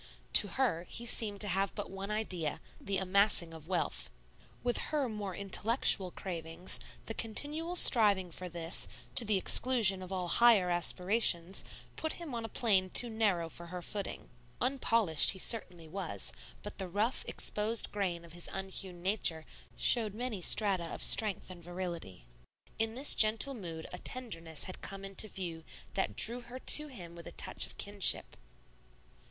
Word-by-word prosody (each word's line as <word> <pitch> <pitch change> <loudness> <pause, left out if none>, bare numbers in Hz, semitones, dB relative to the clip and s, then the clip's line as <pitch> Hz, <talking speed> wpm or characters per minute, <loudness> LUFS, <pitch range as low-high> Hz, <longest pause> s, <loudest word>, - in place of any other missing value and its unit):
To - - +6
her 185 -8 -2
he 235 - -4
seemed 210 -4 +1
to 210 - +2
have 195 +1 -1
but 205 -3 -6
one 195 +1 -7
idea, 185 -8 -2 0.2
the 195 0 -2
amassing 190 -2 +2
of 160 -1 -12
wealth. 180 -2 -2 0.5
With 245 -1 0
her 295 -4 -1
more 205 -4 -6
intellectual 200 0 +1
cravings, 170 -1 -5 0.3
the 225 - -5
continual 300 +11 -4
striving 205 - +5
for 180 +2 -7
this, 170 0 +1 0.3
to - - +5
the 210 -2 +1
exclusion 210 -2 +3
of 185 0 -9
all 185 -2 -3
higher 205 -2 +4
aspirations, 180 +1 +2 0.3
put 315 - -2
him 335 -6 -9
on 230 -1 -4
a 225 - -6
plane 195 -5 +1
too 240 +5 +2
narrow 200 -7 0
for 170 +1 -9
her 180 0 -7
footing. 200 +2 -5 0.3
Unpolished 230 - +3
he - - -11
certainly 180 -5 +2
was, 185 +1 -4 0.3
but 205 - -9
the 190 - -2
rough, 210 +7 -1
exposed 215 +2 +1
grain 180 -5 -3
of 165 - -13
his 175 0 -6
unhewn 190 -2 -4
nature 180 -5 +1 0.3
showed 220 -4 +2
many 230 -4 -4
strata 190 -2 +2
of - - -5
strength 210 -4 0
and 175 -2 -11
virility. 170 - -7 0.5
In 225 0 0
this 275 +3 +8
gentle 225 +6 +4
mood 170 -9 -8
a 180 - -6
tenderness 165 - -3
had 185 - -8
come 195 0 -7
into 195 +2 +1
view 175 -5 -6 0.3
that 190 - -2
drew 240 +2 +2
her 240 +1 -10
to 300 +3 +5
him 180 - -11
with 170 - -11
a - - -8
touch - - 0
of - - -14
kinship. 200 -2 +1
195 Hz, 165 wpm, -31 LUFS, 175-225 Hz, 0.5 s, this